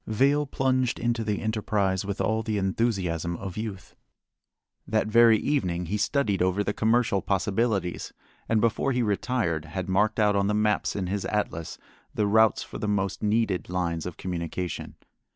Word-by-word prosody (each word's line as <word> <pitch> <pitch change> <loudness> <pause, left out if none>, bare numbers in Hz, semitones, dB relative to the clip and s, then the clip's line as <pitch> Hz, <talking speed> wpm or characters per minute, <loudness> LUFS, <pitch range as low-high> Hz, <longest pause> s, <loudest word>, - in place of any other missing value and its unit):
Vail 140 +7 +2
plunged 130 -2 0
into 120 -1 0
the 105 -1 -2
enterprise 105 -3 0
with 100 0 -4
all 110 +3 +1
the 110 -1 -2
enthusiasm 95 -5 -1
of 95 -2 -6
youth. 105 -4 -6 0.9
That 110 0 +1
very 115 0 +6
evening 90 -11 -1
he 100 +5 -2
studied 105 -3 0
over 95 +2 +2
the 105 - -1
commercial 110 -3 +2
possibilities, 100 -1 -1 0.4
and 115 - +3
before 115 +4 +1
he 125 0 +1
retired 100 -6 -1
had 90 +3 -5
marked 105 +4 +1
out 105 -1 +3
on 100 0 +2
the 105 - +1
maps 105 -1 +1
in 95 - -2
his 95 +2 -2
atlas 95 -6 -2 0.4
the 105 - +1
routes 110 +2 +4
for - - -9
the 105 - -2
most 100 -2 -1
needed 105 -4 0
lines 85 -2 -2
of 90 - -7
communication. 90 0 -4
105 Hz, 165 wpm, -26 LUFS, 95-110 Hz, 0.9 s, very